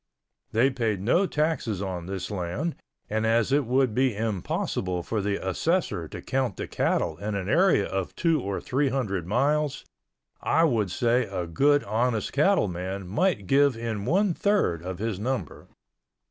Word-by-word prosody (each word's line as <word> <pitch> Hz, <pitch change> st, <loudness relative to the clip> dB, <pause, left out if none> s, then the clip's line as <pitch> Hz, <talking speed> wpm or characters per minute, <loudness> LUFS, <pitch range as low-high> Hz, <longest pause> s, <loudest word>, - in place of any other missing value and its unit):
They 125 Hz, +5 st, +3 dB
paid 115 Hz, -6 st, -1 dB
no 170 Hz, -, +2 dB
taxes 150 Hz, -, -1 dB
on 90 Hz, -3 st, -4 dB
this 95 Hz, -1 st, -4 dB
land 100 Hz, -, -2 dB, 0.3 s
and 110 Hz, +1 st, -1 dB
as 115 Hz, +2 st, +2 dB
it 140 Hz, -3 st, +2 dB
would 130 Hz, -2 st, +2 dB
be 130 Hz, -1 st, +2 dB
impossible 95 Hz, -4 st, -2 dB
for 110 Hz, +3 st, -2 dB
the 100 Hz, 0 st, 0 dB
assessor 95 Hz, -, 0 dB
to -, -, -9 dB
count 130 Hz, -6 st, -1 dB
the -, -, -4 dB
cattle -, -, 0 dB
in 105 Hz, 0 st, -3 dB
an 95 Hz, -2 st, -3 dB
area 170 Hz, -, +4 dB
of 95 Hz, -1 st, -3 dB
two 165 Hz, -3 st, +2 dB
or 100 Hz, 0 st, -3 dB
three 135 Hz, +2 st, 0 dB
hundred 100 Hz, -10 st, -2 dB
miles, 145 Hz, +7 st, +1 dB, 0.6 s
I 165 Hz, -, +3 dB
would 115 Hz, -, +2 dB
say 120 Hz, +5 st, +1 dB
a 95 Hz, -3 st, -3 dB
good 140 Hz, -, +3 dB
honest 110 Hz, +1 st, -1 dB
cattle 155 Hz, -, +3 dB
man 95 Hz, +1 st, -5 dB
might 115 Hz, -, +1 dB
give 140 Hz, +2 st, +3 dB
in 110 Hz, -3 st, -3 dB
one 190 Hz, +6 st, +2 dB
third 195 Hz, -, +1 dB
of 90 Hz, +1 st, -5 dB
his 105 Hz, -1 st, -3 dB
number. 120 Hz, -, -3 dB
115 Hz, 165 wpm, -26 LUFS, 95-140 Hz, 0.6 s, area